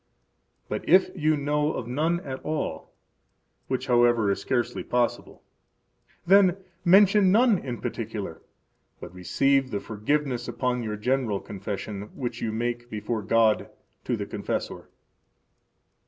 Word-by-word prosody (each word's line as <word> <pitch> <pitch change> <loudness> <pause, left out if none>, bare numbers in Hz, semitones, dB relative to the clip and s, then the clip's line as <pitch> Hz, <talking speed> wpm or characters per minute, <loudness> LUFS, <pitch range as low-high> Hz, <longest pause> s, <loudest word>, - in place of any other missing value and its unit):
But - - -4
if 185 +2 +5
you 155 -3 +1
know 150 +1 0
of 125 - -4
none 160 +7 0
at 135 -5 -6
all 150 - -3 0.8
(which, 130 0 -2
however 120 -4 +3
is 100 - -2
scarcely 120 -1 -1
possible), 120 -1 -2 0.8
then 190 0 +5 0.3
mention 195 +1 +6
none 225 -2 +4
in 125 -3 -5
particular, 105 -7 -5 0.6
but - - -10
receive 135 +9 +1
the 105 - -2
forgiveness 120 +4 -2
upon 125 +1 -1
your 105 -2 -4
general 120 -2 0
confession 100 +1 -6
which 120 -3 -4
you 110 - -1
make 120 +2 -3
before 110 +1 -3
God 110 +1 +2 0.4
to - - -1
the - - -4
confessor. - - -4
120 Hz, 125 wpm, -26 LUFS, 110-150 Hz, 0.8 s, mention